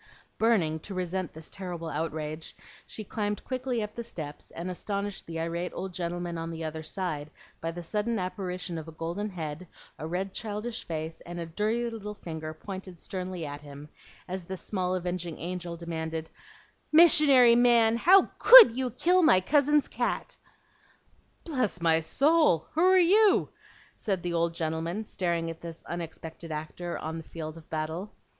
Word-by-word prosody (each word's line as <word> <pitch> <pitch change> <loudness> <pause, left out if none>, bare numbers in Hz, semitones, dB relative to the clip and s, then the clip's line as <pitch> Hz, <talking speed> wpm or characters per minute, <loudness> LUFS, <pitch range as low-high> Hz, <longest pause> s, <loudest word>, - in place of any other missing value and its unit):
Burning 185 -9 +2
to 195 +5 -8
resent 185 -1 -2
this 160 0 -10
terrible 175 -3 -6
outrage, 155 0 -4 0.3
she 215 - -6
climbed 210 0 -3
quickly 255 -3 -2
up 210 - -6
the 235 - -5
steps, 150 -8 -8
and 175 +2 -5
astonished 200 +2 -4
the 165 0 -5
irate 170 +2 -2
old 190 -1 -5
gentleman 175 -1 -3
on 165 0 -4
the 165 0 -5
other 160 0 -4
side 155 -2 -4 0.3
by 165 - -2
the 175 +1 -6
sudden 210 +6 -1
apparition 180 -3 -3
of 160 - -9
a - - -8
golden 170 +6 -3
head, 165 -1 -6 0.3
a 155 - -4
red 185 +3 -3
childish 220 +2 -4
face, 160 0 -5
and 175 0 -7
a 170 - -3
dirty 215 +8 -1
little 210 -2 -6
finger 160 -5 -6
pointed 185 +2 -8
sternly 185 -3 -5
at 145 0 -6
him, 145 0 -11 0.4
as 185 -1 -5
this 190 +1 -6
small 185 -2 -1
avenging 175 -2 -3
angel 175 0 -5
demanded, 160 -1 -4 0.6
"Missionary 300 -7 +8
man, 235 -2 +5
how 370 +9 +7 0.2
COULD - - +11
you 255 0 -1
kill 350 +10 +3
my 250 - +6
cousin's 290 +7 +3
cat?" - - -2 1.1
"Bless 255 - -1
my 165 -1 +3
soul! 275 - +3
who 320 - 0
are 375 +1 +6
you?" 390 +3 +5 0.5
said 190 -4 -2
the 175 -1 -2
old 170 0 0
gentleman, 165 +6 -2
staring 170 -4 -1
at 165 - -11
this 165 -1 -8
unexpected 165 -1 -7
actor 155 +3 -5
on 160 +1 -5
the - - -8
field 155 -1 -7
of 165 -1 -14
battle. 160 +6 -4
180 Hz, 165 wpm, -28 LUFS, 165-215 Hz, 1.1 s, COULD